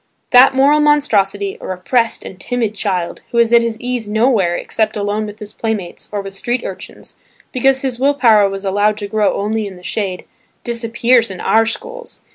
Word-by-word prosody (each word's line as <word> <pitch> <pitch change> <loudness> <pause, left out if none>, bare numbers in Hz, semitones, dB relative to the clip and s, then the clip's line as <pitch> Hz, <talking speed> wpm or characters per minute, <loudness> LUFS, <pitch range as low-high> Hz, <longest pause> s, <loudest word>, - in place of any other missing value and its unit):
That 260 +1 +7
moral 285 +3 +4
monstrosity, 205 -10 +1
a - - -7
repressed 230 +6 -1
and 190 - -10
timid 235 -1 -2
child, 190 -5 -3
who 235 - -4
is 235 0 +3
at 235 - +7
his 230 -1 -3
ease 245 -3 -3
nowhere 215 -5 +2
except 215 +3 -2
alone 210 +1 -2
with 210 0 -9
his 210 -1 -10
playmates, 215 -6 -4
or 205 -1 -2
with 195 0 -8
street 240 +5 -2
urchins, - - -9 0.3
because 265 +1 +2
his 255 -3 -2
will 280 +2 +2
power 220 -7 +4
was 195 0 -6
allowed 205 +2 +1
to 205 -1 -5
grow 210 0 +1
only 215 +1 -2
in 195 - -9
the 180 - -15
shade, 190 -2 -3 0.4
disappears 235 0 +1
in 185 -2 -8
our 225 0 +2
schools. 480 - -6
220 Hz, 190 wpm, -17 LUFS, 200-245 Hz, 0.4 s, That